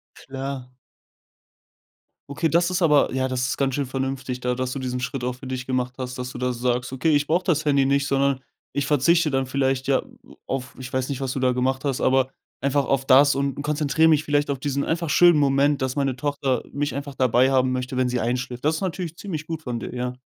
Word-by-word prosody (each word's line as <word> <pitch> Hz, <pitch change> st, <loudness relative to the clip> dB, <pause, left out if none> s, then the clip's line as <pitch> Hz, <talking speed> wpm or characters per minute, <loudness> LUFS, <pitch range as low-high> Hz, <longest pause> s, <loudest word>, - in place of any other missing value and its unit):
Klar. 135 Hz, -1 st, -6 dB, 1.6 s
Okay, 155 Hz, +3 st, 0 dB
das 170 Hz, +1 st, +3 dB
ist 185 Hz, 0 st, -1 dB
aber 150 Hz, -5 st, +4 dB
ja, 130 Hz, 0 st, 0 dB
das 125 Hz, 0 st, -1 dB
ist -, -, -2 dB
ganz 135 Hz, -2 st, 0 dB
schön 145 Hz, -, -1 dB
vernünftig 130 Hz, -1 st, -3 dB
da 125 Hz, 0 st, 0 dB
dass 130 Hz, 0 st, -3 dB
du 135 Hz, -, -4 dB
diesen 125 Hz, -1 st, -3 dB
Schritt 125 Hz, 0 st, -4 dB
auch 125 Hz, 0 st, -2 dB
für 130 Hz, +1 st, -10 dB
dich 130 Hz, -1 st, -4 dB
gemacht 125 Hz, -1 st, -1 dB
hast, 130 Hz, 0 st, -5 dB
dass 125 Hz, 0 st, -5 dB
du -, -, -7 dB
da 125 Hz, 0 st, 0 dB
sagst: 125 Hz, +1 st, -1 dB
„Okay, 135 Hz, +5 st, +1 dB
ich 145 Hz, -, +2 dB
brauche 175 Hz, +5 st, +1 dB
das 160 Hz, -4 st, +1 dB
Handy 140 Hz, -2 st, +3 dB
nicht, 140 Hz, +1 st, +2 dB
sondern 135 Hz, -1 st, +1 dB, 0.3 s
ich 140 Hz, -1 st, -1 dB
verzichte 150 Hz, +3 st, +3 dB
dann 135 Hz, 0 st, +1 dB
vielleicht 135 Hz, 0 st, 0 dB
ja 135 Hz, -, +2 dB, 0.4 s
auf 130 Hz, -2 st, -4 dB
ich 130 Hz, 0 st, -8 dB
weiß 130 Hz, -1 st, -1 dB
nicht, 140 Hz, -1 st, -4 dB
was 130 Hz, -2 st, -2 dB
du 135 Hz, -, -3 dB
da 130 Hz, -1 st, +2 dB
gemacht 130 Hz, +2 st, -1 dB
hast, 135 Hz, -3 st, -1 dB
aber 130 Hz, 0 st, +3 dB, 0.3 s
einfach 140 Hz, +1 st, +1 dB
auf 135 Hz, -1 st, 0 dB
das 140 Hz, +2 st, +6 dB
und 140 Hz, 0 st, -2 dB
konzentriere 150 Hz, +1 st, +2 dB
mich 155 Hz, 0 st, +3 dB
vielleicht 145 Hz, -1 st, +1 dB
auf 135 Hz, -2 st, -1 dB
diesen 140 Hz, 0 st, -1 dB
einfach 165 Hz, -1 st, -1 dB
schönen 175 Hz, 0 st, +6 dB
Moment, 140 Hz, 0 st, +2 dB
dass 130 Hz, 0 st, -1 dB
meine 135 Hz, -3 st, 0 dB
Tochter 140 Hz, -3 st, -1 dB
mich 145 Hz, -2 st, -1 dB
einfach 140 Hz, -1 st, -5 dB
dabei 130 Hz, +1 st, +3 dB
haben 130 Hz, -1 st, +2 dB
möchte, 130 Hz, 0 st, -3 dB
wenn 130 Hz, -1 st, +1 dB
sie 125 Hz, -, -1 dB
einschläft." 125 Hz, +2 st, -3 dB
Das 155 Hz, -, +3 dB
ist 160 Hz, -, -4 dB
natürlich 175 Hz, -3 st, -3 dB
ziemlich 160 Hz, -6 st, -6 dB
gut 165 Hz, -1 st, -4 dB
von 120 Hz, -4 st, -3 dB
dir, 125 Hz, -, -7 dB
ja. 125 Hz, 0 st, -3 dB
135 Hz, 230 wpm, -23 LUFS, 130-145 Hz, 1.6 s, das